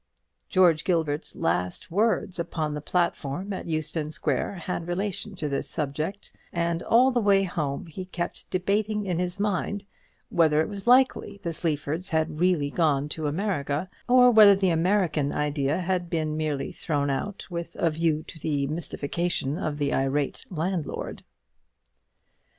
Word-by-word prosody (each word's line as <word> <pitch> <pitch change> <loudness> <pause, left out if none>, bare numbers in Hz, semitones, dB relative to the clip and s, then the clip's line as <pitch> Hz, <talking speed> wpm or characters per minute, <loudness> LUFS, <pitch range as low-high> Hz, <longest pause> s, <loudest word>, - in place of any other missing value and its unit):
George 175 -5 +4
Gilbert's 160 -4 0
last 90 - -1
words 200 -2 +1
upon 160 -3 -2
the 150 - -4
platform 175 +2 -1
at 185 - -5
Euston 155 -1 -2
Square 155 +4 -1
had 175 -1 -4
relation 195 +3 -3
to 155 -5 -3
this 140 -1 -2
subject; 155 +6 -3 0.2
and 170 0 -1
all 250 +3 +4
the 245 -2 +1
way 200 -2 +4
home 150 -6 -2
he 175 +3 -7
kept 175 -2 -5
debating 205 +3 0
in 175 -3 -1
his 180 +1 -2
mind 205 0 -1 0.4
whether 155 -3 +3
it 160 - +2
was 200 +1 -7
likely 255 -4 +4
the 170 - -2
Sleafords 155 +2 -2
had 160 -1 0
really 170 -5 +2
gone 150 -4 +1
to 155 0 -3
America, 155 -2 -1 0.2
or 250 0 +7
whether 210 -3 +8
the 190 -2 +2
American 165 -4 +2
idea 145 -1 0
had 180 -1 -1
been 155 -2 -1
merely 150 -3 -2
thrown 145 -3 -1
out 195 +9 -3
with 170 -1 -5
a 165 - +1
view 160 -1 0
to 160 - -11
the 145 -2 0
mystification 155 0 -1
of 150 -1 -2
the 145 -1 0
irate 135 +1 0
landlord. 175 -1 -3
170 Hz, 150 wpm, -26 LUFS, 150-190 Hz, 0.4 s, whether